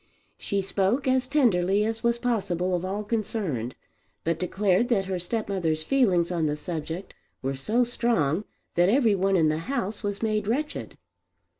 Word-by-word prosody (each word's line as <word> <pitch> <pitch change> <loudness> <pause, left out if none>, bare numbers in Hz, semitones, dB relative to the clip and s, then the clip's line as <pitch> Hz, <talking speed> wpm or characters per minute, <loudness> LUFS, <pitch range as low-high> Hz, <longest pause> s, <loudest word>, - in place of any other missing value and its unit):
She 200 -1 -1
spoke 200 +8 0
as 260 -1 +2
tenderly 210 -8 +3
as 225 0 -2
was 235 0 +2
possible 185 -7 0
of 175 - -2
all 195 +3 -2
concerned, 200 - -2 0.5
but 165 0 0
declared 190 +4 +1
that 200 -6 +2
her 185 -1 -2
stepmother's 175 -5 -1
feelings 185 -9 +2
on 165 -3 +1
the 150 - 0
subject 165 +3 -5 0.3
were 135 +1 -1
so 215 - +1
strong 220 - +1 0.3
that 175 +2 +4
every 230 -2 +4
one 195 0 +2
in 160 -2 +4
the 155 +1 0
house 215 -6 -2
was 205 0 -3
made 215 -2 0
wretched. 290 +7 -2
195 Hz, 160 wpm, -26 LUFS, 175-230 Hz, 0.5 s, that